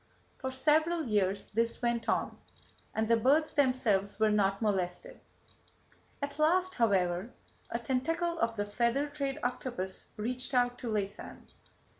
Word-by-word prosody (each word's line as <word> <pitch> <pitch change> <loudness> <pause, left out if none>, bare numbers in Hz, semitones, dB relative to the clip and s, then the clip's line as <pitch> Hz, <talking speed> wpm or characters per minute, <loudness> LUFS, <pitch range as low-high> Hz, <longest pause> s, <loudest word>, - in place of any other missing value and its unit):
For 260 - -3
several 310 +5 +2
years 200 -5 0
this 230 +2 0
went 235 -1 -1
on, - - 0 0.6
and 220 0 +1
the 230 - +5
birds 285 +7 +3
themselves 225 -8 +1
were 220 -1 +4
not 195 -2 +2
molested. 210 - -2 1.0
At 285 +1 -4
last, 365 +4 +3
however, 190 - +1 0.4
a - - -1
tentacle 325 +8 -1
of 230 0 +1
the 205 -1 -1
feather 235 +6 +1
trade 280 -1 -3
octopus 245 -7 -3
reached 255 +5 -3
out 245 0 +2
to 245 - -5
Laysan. 205 -3 -4
240 Hz, 135 wpm, -31 LUFS, 210-285 Hz, 1.0 s, the